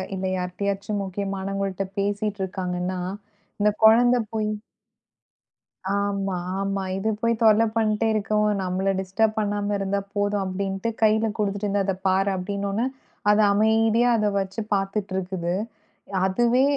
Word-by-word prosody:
இல்ல 190 0 -3
யார்ட்டாச்சும் 200 +3 -2
முக்கியமானவங்கள்ட்ட 195 0 -3
பேசிட்டு 205 0 -1
இருக்காங்கன்னா 185 -1 -3 0.6
இந்தக் 210 0 +1
கொழந்தை 245 +3 +6
போய் 215 -1 0 1.5
ஆமா, 200 -2 -1 0.2
ஆமா. 195 0 -1 0.2
இது 215 +3 0
போய் 230 0 +1
தொல்ல 220 0 +6
பண்ட்டே 220 0 +2
இருக்கவும். 210 0 +1
நம்மள 185 +1 0
டிஸ்டர்ப் 215 +3 0
பண்ணாம 205 -1 0
இருந்தா 195 0 -1
போதும் 205 0 0
அப்டின்டு 195 +2 -2
கைல 220 +1 +4
குடுத்துட்டு 205 0 0
அதப் 190 -1 -3
பாரு 190 +1 +3
அப்டின்னனோன 200 +4 -2 0.4
அது 210 +1 +5
அமைதியா 220 +3 +3
அத 215 -1 +1
வச்சு 195 +3 -3
பாத்துட்டுருக்குது. 190 -3 -2 0.7
அதுவே 240 +6 +3
200 Hz, 115 wpm, -24 LUFS, 195-215 Hz, 1.5 s, கொழந்தை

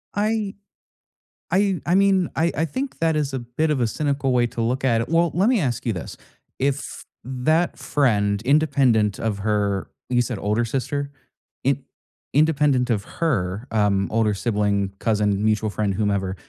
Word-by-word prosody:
I 210 -1 0 1.0
I 190 -3 +2
I 175 +4 +2
mean, 195 -2 +3
I 165 +1 +2
I 160 +3 +1
think 260 - -5
that 165 -1 +2
is 145 -3 -1
a 130 - -1
bit 125 +7 -1
of 135 -4 0
a 115 - +2
cynical 140 +1 -1
way 120 -1 +3
to 120 0 -5
look 125 +4 -1
at 115 -3 +2
it. 115 - -4
Well, 165 0 +3
let 195 +8 +3
me 245 -5 +3
ask 125 -7 -2
you 115 - +1
this. 90 - -7 0.4
If 140 +1 +1 0.4
that 145 +7 0
friend, 105 -8 +1
independent 130 -7 +2
of 105 -3 -2
her, 100 -2 0 0.2
you 120 -1 +3
said 120 -4 -3
older 105 +3 0
sister? 140 +3 -3 0.5
In 135 0 +1 0.5
independent 145 -4 +3
of 105 -4 0
her, 110 - -2
um, 100 -3 +2
older 110 -2 +2
sibling, 100 -2 0
cousin, 105 -2 +1
mutual 110 0 +1
friend, 105 -1 -1
whomever, 100 -2 -1
125 Hz, 165 wpm, -23 LUFS, 105-150 Hz, 1.0 s, mean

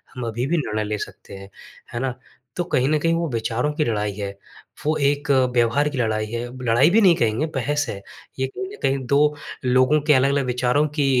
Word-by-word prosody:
हम 125 -2 -4
अभी 115 +2 -2
भी 170 - +1
निर्णय 110 -8 -1
ले 105 0 -2
सकते 95 0 -13
हैं। 95 0 -11 0.4
है 120 - -2
ना? 130 -1 -2 0.4
तो 175 - +1
कहीं 130 -6 +1
न 155 - +3
कहीं 165 +2 +1
वो 170 0 0
विचारों 115 +4 -1
की 155 - 0
लड़ाई 105 -3 -1
है, 100 0 -4 0.6
वो 155 - +2
एक 145 +1 -1 0.2
व्यवहार 120 +5 +2
की 145 - -6
लड़ाई 110 -2 0
है। 115 +2 -4 0.3
लड़ाई 120 +6 +4
भी 215 +5 +4
नहीं 185 -4 +6
कहेंगे, 115 +4 0
बहस 145 +3 0
है। 100 - -6 0.4
ये 130 - +1
कहीं 255 - -6
न - - -10
कहीं 135 +1 +2
2 140 +3 +3 0.5
लोगों 130 +4 +4
के 150 - +6
अलग-अलग 140 +1 +2
विचारों 125 +4 +1
की 145 - +2
130 Hz, 215 wpm, -22 LUFS, 115-150 Hz, 0.6 s, नहीं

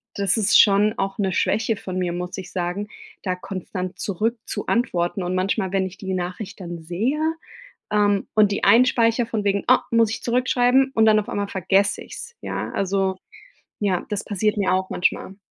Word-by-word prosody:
das 200 0 +1
ist 200 -2 +4
schon 210 +1 +3
auch 195 0 -2
'ne 190 -2 +1
Schwäche 220 +3 +1
von 185 -2 -6
mir, 175 -1 -1
muss 180 +2 -5
ich 185 - -9
sagen, 180 +3 -3 0.4
da 185 -2 -1
konstant 185 0 -6
zurück 220 +5 -1
zu - - -4
antworten 185 -6 0
und 180 +1 -2
manchmal, 190 +1 0
wenn 190 -1 +1
ich 185 - -12
die 190 -1 -4
Nachricht 185 +3 -5
dann 170 -2 -6
sehe, 215 - -1 0.7
ähm, 205 -1 +2
und 210 -2 +4
die - - -2
einspeichere 235 -1 +4
von 220 -2 -2
wegen: 200 0 +1
„Ah, 255 - +5
muss 230 -2 +3
ich - - -5
zurückschreiben.“ 250 +2 +2
und 220 0 +4
dann 215 -1 +5
auf 205 - -9
einmal 200 -1 -2
vergesse 195 +2 +1
ich - - -15
es, 475 0 -9
ja? - - -4
Also, 195 -1 0 0.6
ja, 190 -4 0
das 205 0 -2
passiert 210 +1 0
mir 190 -2 +1
auch 185 0 -1
manchmal. 190 +1 -1
200 Hz, 190 wpm, -22 LUFS, 185-220 Hz, 0.7 s, Ah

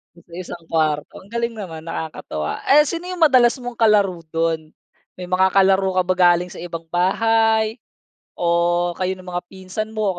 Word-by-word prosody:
Sa 170 -1 -17
isang 175 -1 -7
kuwarto 155 -2 -1
ang 200 - -20
galing 235 0 -2
naman 165 -6 -8
nakakatuwa. 155 - -5
Eh, 295 +2 +7
sino 335 +4 -4
yung 360 -3 +2
madalas 255 -5 +5
mong 245 -2 -8
kalaro 205 -5 +3
do'n? 165 -1 -1 0.5
May 180 - -7
mga 185 +1 +2
kalaro 190 -1 +3
ka 185 - +4
ba 185 +1 +1
galing 175 -1 +3
sa - - -9
ibang 165 -1 -6
bahay, 220 +4 +2 0.5
o 175 0 +1
kayo 185 0 -1
ng 185 - -14
mga 180 0 -4
pinsan 195 +4 -6
mo 205 -4 -1
185 Hz, 170 wpm, -21 LUFS, 170-220 Hz, 0.5 s, Eh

